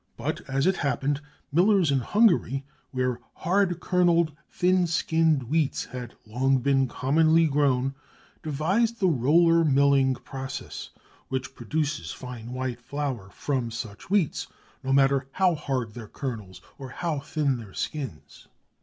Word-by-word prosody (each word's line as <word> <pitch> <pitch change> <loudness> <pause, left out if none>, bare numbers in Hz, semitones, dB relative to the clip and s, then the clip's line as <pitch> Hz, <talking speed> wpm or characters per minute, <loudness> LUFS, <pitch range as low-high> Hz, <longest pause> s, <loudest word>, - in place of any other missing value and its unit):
But - - -3
as 135 +2 +1
it 190 0 +3
happened 140 0 0 0.3
millers 180 0 +4
in 135 - +3
Hungary, 135 - +2 0.2
where 125 -2 -1 0.2
hard 180 -1 +1
kernelled, 170 -4 +2
thin 180 0 +2
skinned 160 -3 +2
wheats 150 +3 0
had 125 -1 -8
long 130 +5 +2
been 135 +1 +2
commonly 160 +6 +3
grown, 135 -3 +2 0.5
devised 190 +10 0
the 190 - +3
roller 165 +4 +4
milling 140 -2 +4
process, 135 +1 -7 0.4
which 130 -1 -3
produces 145 +4 -2
fine 125 -2 -8
white 130 -1 -3
flour 135 -8 -4
from 125 +4 -2
such 110 -3 -7
wheats, 190 -5 0 0.4
no 135 - -2
matter 135 0 +3
how 185 -2 +3
hard 130 -7 -3
their 120 -3 -8
kernels 110 -10 -6 0.2
or 135 -2 -7
how 160 +2 -2
thin 140 -2 -1
their 110 -5 -11
skins. 105 - -6
140 Hz, 135 wpm, -26 LUFS, 130-165 Hz, 0.5 s, millers